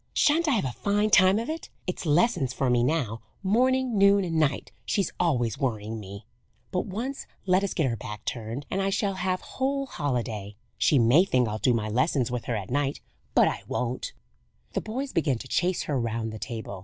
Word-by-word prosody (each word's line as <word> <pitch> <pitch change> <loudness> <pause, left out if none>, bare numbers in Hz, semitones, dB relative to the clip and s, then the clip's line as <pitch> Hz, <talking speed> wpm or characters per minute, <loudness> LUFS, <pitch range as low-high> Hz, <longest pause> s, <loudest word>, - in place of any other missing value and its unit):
Shan't 320 +3 +3
I 290 - +3
have 220 - +1
a 130 - -1
fine 205 - 0
time 185 0 +6
of 230 - -2
it! 320 +1 -5 0.2
It's 180 -2 -4
lessons 155 - +2
for 130 -1 +1
me 120 -1 +3
now, 125 -6 0 0.2
morning, 250 +2 +2
noon, 200 0 +6
and 165 -3 0
night, 145 -3 0
she's 195 -4 0
always 125 - +1
worrying 110 -4 -2
me; 100 0 -9 0.5
but, 180 - -1
once 240 +8 -4 0.2
let 185 +1 +3
us 200 - -2
get 160 - +2
her 120 -3 0
back 105 -1 -8
turned, 120 +4 -4
and 195 - 0
I 195 - +1
shall 195 0 0
have 185 0 -1
whole 275 +1 -2
holiday! 115 - -3 0.2
She 145 - +4
may 125 +8 +6
think 130 -11 +2
I'll 110 0 -3
do 125 0 +3
my 110 -2 -1
lessons 125 +2 +1
with 125 -2 -3
her 120 - -1
at 100 -1 -5
night; 140 +1 0 0.4
but - - +6
I - - -2
won't!" 125 0 -2 0.6
The - - 0
boys 260 +6 -4
began 145 -6 +1
to 130 - -9
chase 180 +6 +1
her 140 -3 -1
round 115 -1 -2
the 110 - -7
table. 110 -5 -6
145 Hz, 205 wpm, -27 LUFS, 115-195 Hz, 0.6 s, time